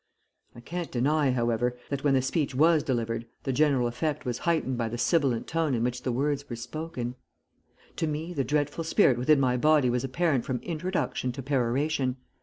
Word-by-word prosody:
I 120 Hz, -, -11 dB
can't 175 Hz, +6 st, -5 dB
deny, 140 Hz, +3 st, +2 dB
however, 120 Hz, 0 st, 0 dB
that 140 Hz, -1 st, -2 dB
when 140 Hz, -2 st, +3 dB
the 130 Hz, -, +2 dB
speech 135 Hz, -1 st, -1 dB
was 160 Hz, +3 st, +5 dB
delivered 115 Hz, -5 st, -2 dB, 0.2 s
the 135 Hz, -, -1 dB
general 140 Hz, -3 st, +3 dB
effect 145 Hz, +5 st, -2 dB
was 125 Hz, -1 st, -2 dB
heightened 160 Hz, -6 st, 0 dB
by 115 Hz, -2 st, -1 dB
the 120 Hz, -, -4 dB
sibilant 125 Hz, -2 st, +1 dB
tone 160 Hz, -4 st, 0 dB
in 115 Hz, -, 0 dB
which 125 Hz, 0 st, -1 dB
the 130 Hz, -, -1 dB
words 140 Hz, +3 st, -1 dB
were 120 Hz, -, -4 dB
spoken. 125 Hz, 0 st, -5 dB, 0.8 s
To 160 Hz, -, 0 dB
me 155 Hz, +3 st, -3 dB
the 140 Hz, -5 st, 0 dB
dreadful 145 Hz, +3 st, -1 dB
spirit 160 Hz, -, +3 dB
within 145 Hz, +4 st, +4 dB
my 125 Hz, -2 st, +2 dB
body 150 Hz, -2 st, +4 dB
was 125 Hz, 0 st, 0 dB
apparent 135 Hz, -1 st, +1 dB
from 130 Hz, -, -2 dB
introduction 170 Hz, -6 st, -2 dB
to 135 Hz, -, -6 dB
peroration. 130 Hz, 0 st, 0 dB
135 Hz, 190 wpm, -27 LUFS, 125-155 Hz, 0.8 s, was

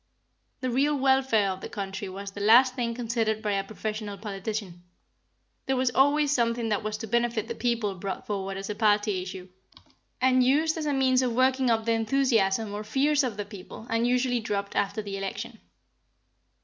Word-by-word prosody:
The 255 Hz, -1 st, -1 dB
real 285 Hz, +4 st, +2 dB
welfare 265 Hz, -7 st, +3 dB
of 185 Hz, -, -6 dB
the -, -, -6 dB
country 200 Hz, -2 st, -5 dB
was 195 Hz, +1 st, -7 dB
the 200 Hz, -, -8 dB
last 245 Hz, +5 st, +6 dB
thing 235 Hz, -3 st, -2 dB
considered 225 Hz, -2 st, -1 dB
by 210 Hz, -, 0 dB
a 195 Hz, -1 st, 0 dB
professional 215 Hz, 0 st, -5 dB
politician. 200 Hz, -3 st, -5 dB, 0.9 s
There 265 Hz, -, +1 dB
was 255 Hz, -1 st, +1 dB
always 285 Hz, +3 st, +3 dB
something 235 Hz, -3 st, +1 dB
that 210 Hz, -, 0 dB
was 215 Hz, 0 st, -3 dB
to 225 Hz, +1 st, -6 dB
benefit 235 Hz, 0 st, 0 dB
the 235 Hz, -, -3 dB
people 230 Hz, -4 st, -1 dB
brought 190 Hz, +1 st, -5 dB
forward 195 Hz, -2 st, -3 dB
as 195 Hz, 0 st, -5 dB
a 210 Hz, -, -2 dB
party 205 Hz, -2 st, +2 dB
issue, 185 Hz, 0 st, -7 dB, 0.7 s
and 255 Hz, 0 st, +4 dB
used 305 Hz, +5 st, +2 dB
as 315 Hz, -2 st, -3 dB
a -, -, +1 dB
means 260 Hz, -1 st, +3 dB
of 250 Hz, -2 st, 0 dB
working 260 Hz, +1 st, +2 dB
up 225 Hz, -1 st, +1 dB
the 230 Hz, -, +1 dB
enthusiasm 225 Hz, -3 st, +1 dB
or 210 Hz, +1 st, -4 dB
fears 285 Hz, +6 st, +2 dB
of 235 Hz, -6 st, -3 dB
the 205 Hz, -, -3 dB
people, 205 Hz, +1 st, -10 dB
and 230 Hz, +1 st, +2 dB
usually 245 Hz, 0 st, +1 dB
dropped 200 Hz, -2 st, -3 dB
after 200 Hz, +2 st, 0 dB
the 200 Hz, -1 st, -5 dB
election. 210 Hz, +4 st, -5 dB
225 Hz, 190 wpm, -27 LUFS, 205-255 Hz, 0.9 s, last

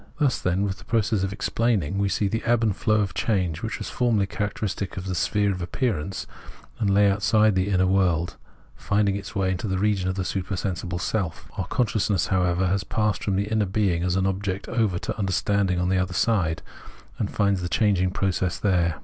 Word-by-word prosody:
Thus, 140 Hz, -5 st, +2 dB
then, 90 Hz, +2 st, 0 dB
with 100 Hz, -1 st, -2 dB
the -, -, -13 dB
process 110 Hz, -3 st, +1 dB
of 95 Hz, 0 st, -1 dB
explaining, 100 Hz, -4 st, 0 dB
we 100 Hz, 0 st, +1 dB
see 100 Hz, -, +1 dB
the 115 Hz, +3 st, -2 dB
ebb 120 Hz, -1 st, +2 dB
and 105 Hz, -4 st, +2 dB
flow 110 Hz, 0 st, +2 dB
of 95 Hz, -3 st, -2 dB
change, 90 Hz, -7 st, 0 dB
which 115 Hz, -, -3 dB
was -, -, -6 dB
formerly 115 Hz, -5 st, +2 dB
char 105 Hz, +1 st, -2 dB
acteristic 100 Hz, -2 st, -4 dB
of 95 Hz, -, -4 dB
the 95 Hz, -, -2 dB
sphere 100 Hz, +3 st, +1 dB
of 90 Hz, -1 st, -4 dB
appearance, 95 Hz, -, -2 dB, 0.5 s
and 105 Hz, -4 st, +1 dB
lay 100 Hz, +1 st, +5 dB
outside 105 Hz, +2 st, +3 dB
the 95 Hz, +1 st, +1 dB
inner 95 Hz, -2 st, +3 dB
world, 90 Hz, -3 st, +1 dB, 0.4 s
finding 100 Hz, -1 st, +1 dB
its 100 Hz, +2 st, -7 dB
way 95 Hz, -1 st, +1 dB
into 95 Hz, +4 st, -3 dB
the 95 Hz, -1 st, -1 dB
region 100 Hz, -2 st, +1 dB
of 95 Hz, -, -2 dB
the 95 Hz, -1 st, -2 dB
supersensible 95 Hz, -2 st, -3 dB
itself. 90 Hz, -2 st, -2 dB
Our -, -, -3 dB
consciousness, 105 Hz, -5 st, +1 dB
however, 90 Hz, 0 st, +2 dB
has 95 Hz, +1 st, +1 dB
passed 105 Hz, 0 st, -1 dB
from 100 Hz, -, 0 dB
the 100 Hz, +1 st, +1 dB
inner 105 Hz, -1 st, 0 dB
being 95 Hz, -3 st, +1 dB
as 90 Hz, 0 st, 0 dB
an 95 Hz, -1 st, +1 dB
object 95 Hz, 0 st, -2 dB
over 110 Hz, -7 st, +1 dB
to -, -, -4 dB
under 95 Hz, -2 st, 0 dB
standing 95 Hz, -1 st, +1 dB
on 90 Hz, 0 st, 0 dB
the 95 Hz, 0 st, +2 dB
other 90 Hz, -1 st, -2 dB
side, 90 Hz, -9 st, +1 dB, 0.6 s
and -, -, -1 dB
finds 100 Hz, -2 st, +1 dB
the 90 Hz, -, -3 dB
changing 100 Hz, -4 st, +2 dB
process 90 Hz, -2 st, -1 dB
there. 85 Hz, -5 st, +1 dB
95 Hz, 210 wpm, -25 LUFS, 90-105 Hz, 0.6 s, lay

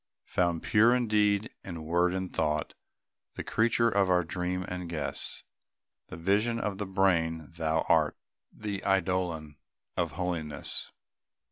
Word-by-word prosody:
"Found 85 Hz, -2 st, 0 dB
pure 115 Hz, +3 st, +5 dB
in 125 Hz, -2 st, +1 dB
deed, 105 Hz, +1 st, +2 dB
and 85 Hz, -4 st, -7 dB
word, 85 Hz, +2 st, +2 dB
and 95 Hz, -1 st, -3 dB
thought," 75 Hz, -1 st, 0 dB, 0.6 s
The -, -, -4 dB
creature 115 Hz, +1 st, +2 dB
of 100 Hz, -4 st, +2 dB
our 90 Hz, -1 st, +4 dB
dream 90 Hz, +2 st, -2 dB
and 90 Hz, -1 st, -5 dB
guess, 80 Hz, -3 st, -2 dB, 0.6 s
The -, -, -8 dB
vision 105 Hz, +7 st, +1 dB
of 105 Hz, -3 st, -2 dB
the 105 Hz, -, -2 dB
brain 85 Hz, -5 st, +1 dB
thou 80 Hz, -1 st, +1 dB
art, -, -, +3 dB, 0.3 s
The 100 Hz, -2 st, -4 dB
eidolon 90 Hz, -6 st, 0 dB, 0.4 s
of 85 Hz, -4 st, -1 dB
holiness. 85 Hz, -3 st, -2 dB
90 Hz, 135 wpm, -29 LUFS, 80-100 Hz, 0.6 s, pure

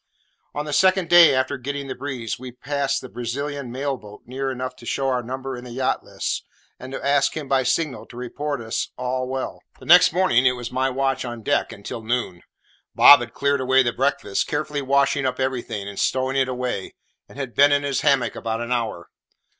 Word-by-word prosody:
On 145 Hz, +1 st, -2 dB
the 150 Hz, -, -4 dB
second 185 Hz, 0 st, +3 dB
day 175 Hz, -5 st, +8 dB
after 130 Hz, +1 st, 0 dB
getting 140 Hz, +2 st, -4 dB
the 130 Hz, -, -4 dB
breeze, 125 Hz, -5 st, -5 dB
we 130 Hz, 0 st, -8 dB
passed 140 Hz, +2 st, -2 dB
the 130 Hz, -, -8 dB
Brazilian 135 Hz, +2 st, -4 dB
mail 135 Hz, +2 st, -2 dB
boat 105 Hz, -3 st, -14 dB
near 135 Hz, +2 st, -3 dB
enough 130 Hz, 0 st, -4 dB
to -, -, -13 dB
show 135 Hz, -1 st, 0 dB
our 125 Hz, -1 st, 0 dB
number 130 Hz, +2 st, -5 dB
in 120 Hz, -, -9 dB
the 125 Hz, -, -9 dB
yacht 130 Hz, +2 st, -1 dB
list, -, -, -4 dB, 0.4 s
and 130 Hz, +1 st, -9 dB
to 135 Hz, -, -6 dB
ask 140 Hz, +1 st, +2 dB
him, 150 Hz, -3 st, -5 dB
by 135 Hz, 0 st, +2 dB
signal, 135 Hz, +2 st, -1 dB
to 120 Hz, -, -13 dB
report 140 Hz, +2 st, -4 dB
us 115 Hz, 0 st, -3 dB
"all 125 Hz, 0 st, -2 dB
well." 130 Hz, 0 st, -4 dB, 0.2 s
The -, -, -13 dB
next -, -, +7 dB
morning 155 Hz, -8 st, +3 dB
it 125 Hz, -, +3 dB
was 120 Hz, -1 st, -6 dB
my 130 Hz, +1 st, 0 dB
watch 135 Hz, 0 st, -1 dB
on 120 Hz, -2 st, -6 dB
deck 145 Hz, +4 st, 0 dB
until 110 Hz, +3 st, -7 dB
noon. 110 Hz, -6 st, -2 dB, 0.5 s
Bob 145 Hz, -, +9 dB
had 120 Hz, -1 st, -7 dB
cleared 140 Hz, -1 st, +1 dB
away 130 Hz, +1 st, +4 dB
the 120 Hz, -1 st, -1 dB
breakfast, 135 Hz, -7 st, 0 dB
carefully 145 Hz, 0 st, -2 dB
washing 140 Hz, 0 st, +2 dB
up 130 Hz, 0 st, -3 dB
everything, 120 Hz, -6 st, -3 dB
and 100 Hz, -1 st, -7 dB
stowing 130 Hz, +1 st, 0 dB
it 135 Hz, -1 st, +2 dB
away, 125 Hz, -6 st, -4 dB, 0.3 s
and -, -, -14 dB
had 135 Hz, -4 st, -5 dB
been 145 Hz, +1 st, +5 dB
in 145 Hz, 0 st, +2 dB
his 140 Hz, -2 st, -1 dB
hammock 125 Hz, -5 st, +2 dB
about 115 Hz, 0 st, -3 dB
an 120 Hz, +1 st, -5 dB
hour. 115 Hz, -8 st, -2 dB
130 Hz, 210 wpm, -23 LUFS, 125-140 Hz, 0.5 s, Bob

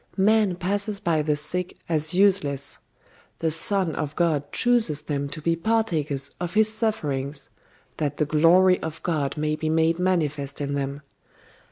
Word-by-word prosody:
Man 205 Hz, -1 st, +3 dB
passes 200 Hz, +3 st, -2 dB
by 165 Hz, -4 st, +1 dB
the 150 Hz, 0 st, 0 dB
sick 175 Hz, +5 st, -2 dB
as 155 Hz, -1 st, 0 dB
useless: 180 Hz, -8 st, +1 dB, 0.6 s
The 165 Hz, -1 st, -1 dB
Son 175 Hz, +1 st, +2 dB
of 150 Hz, -1 st, -4 dB
God 155 Hz, -5 st, 0 dB
chooses 230 Hz, -, +2 dB
them 140 Hz, -1 st, -3 dB
to 155 Hz, +1 st, -8 dB
be 165 Hz, 0 st, +2 dB
partakers 165 Hz, -8 st, -1 dB
of 175 Hz, +2 st, -4 dB
His 215 Hz, 0 st, +5 dB
sufferings, 145 Hz, -, -2 dB, 0.5 s
that 150 Hz, -3 st, -2 dB
the 150 Hz, -, +1 dB
glory 170 Hz, +5 st, +4 dB
of 160 Hz, 0 st, -6 dB
God 155 Hz, -5 st, -1 dB
may 155 Hz, 0 st, 0 dB
be 155 Hz, 0 st, -3 dB
made 165 Hz, +1 st, +2 dB
manifest 155 Hz, -6 st, -1 dB
in 140 Hz, -1 st, -3 dB
them. 140 Hz, 0 st, -3 dB
160 Hz, 155 wpm, -24 LUFS, 145-185 Hz, 0.6 s, His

